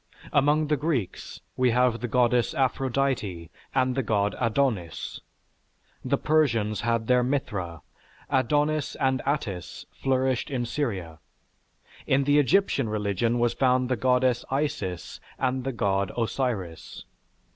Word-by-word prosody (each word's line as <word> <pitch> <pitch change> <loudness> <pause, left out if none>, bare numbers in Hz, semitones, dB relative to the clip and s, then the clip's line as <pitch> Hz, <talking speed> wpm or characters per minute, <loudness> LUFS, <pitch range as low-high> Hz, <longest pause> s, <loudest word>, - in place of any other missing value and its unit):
Among 145 +2 +3
the 150 0 +1
Greeks 135 - -3
we 125 -1 +3
have 125 0 +2
the 125 - -2
Goddess 120 0 +2
Aphrodite 130 -9 -1 0.2
and 130 -1 +2
the 135 - 0
God 105 -3 0
Adonis. 115 - -1 0.8
The 140 +2 +1
Persians 120 -10 +1
had 115 -1 0
their 125 +1 +4
Mithra. 100 - -2 0.4
Adonis 145 +2 +1
and 130 -1 +1
Attis 105 - -3
flourished 130 -1 0
in 125 -4 -2
Syria. 100 - -3 0.9
In 135 +1 +3
the 145 +2 +4
Egyptian 145 - +2
religion 105 +2 0
was 120 0 +2
found 130 -1 +2
the 130 - +2
Goddess 125 +1 +2
Isis 135 - -3 0.2
and 130 -1 -1
the 135 - 0
God 100 -4 0
Osiris. 115 -8 -3
125 Hz, 125 wpm, -26 LUFS, 110-135 Hz, 0.9 s, their